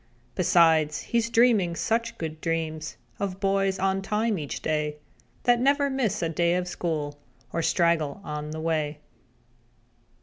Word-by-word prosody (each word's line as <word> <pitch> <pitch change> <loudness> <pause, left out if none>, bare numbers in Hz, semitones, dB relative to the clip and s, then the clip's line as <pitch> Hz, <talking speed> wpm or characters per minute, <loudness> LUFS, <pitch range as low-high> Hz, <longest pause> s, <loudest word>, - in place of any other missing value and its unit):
Besides 160 -4 +4
he's 230 -1 0
dreaming 225 -8 +3
such 230 +5 -1
good 160 -1 -5
dreams 160 -2 -3 0.2
Of 195 -1 -3
boys 195 -1 +1
on 195 0 0
time 210 0 0
each 145 -2 -5
day, 150 -1 -1 0.5
That 245 -1 +4
never 280 +2 +2
miss 255 -10 0
a 165 - 0
day 170 +1 +1
at 180 0 -1
school 155 -5 -3 0.3
Or 165 - 0
straggle 165 -2 +1
on 150 -2 -5
the 155 +1 -5
way. 155 -2 -1
170 Hz, 140 wpm, -26 LUFS, 155-205 Hz, 0.5 s, Besides